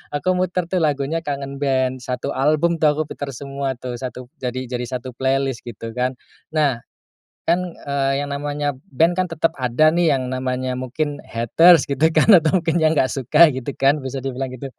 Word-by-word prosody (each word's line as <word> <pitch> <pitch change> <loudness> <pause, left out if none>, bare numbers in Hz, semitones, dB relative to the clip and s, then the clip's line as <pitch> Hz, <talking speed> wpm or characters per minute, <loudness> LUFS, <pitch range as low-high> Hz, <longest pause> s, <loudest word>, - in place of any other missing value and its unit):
aku 145 +5 -1
muter 180 -1 -1
tuh 185 - +1
lagunya 145 +2 0
Kangen 140 -1 -5
Band, 130 -2 0
1 125 -1 -3
album 155 +5 +2
tuh 155 - +4
aku 155 - -1
puter 140 -1 -5
semua 140 0 -4
tuh, 125 -1 -5 0.4
jadi 130 0 -4
jadi 125 0 -2
1 130 +1 -8
playlist, 135 -1 -1
gitu 115 0 -7
kan. 125 +1 -1 0.4
Nah, 140 -6 +1 0.7
kan, 175 +2 +3 0.2
eee, 140 0 -1
yang 145 - -6
namanya 145 0 -2 0.2
band 165 +6 +2
kan 185 -1 +1
tetap 165 0 0
ada 130 +6 +3
nih 170 -2 +3
yang 130 -1 -4
namanya 130 0 -2
mungkin 145 +3 -3
haters, 160 +8 +5
gitu 150 +4 +3
kan, 155 - +4
atau 170 +1 +5
mungkin 165 0 0
yang 160 0 +3
nggak 130 - +2
suka, 150 +5 +5
gitu 130 +1 -5
kan, 140 +2 +3
bisa 135 0 -4
dibilang 135 -1 -3
gitu. 135 +2 -7
140 Hz, 185 wpm, -21 LUFS, 130-155 Hz, 0.7 s, haters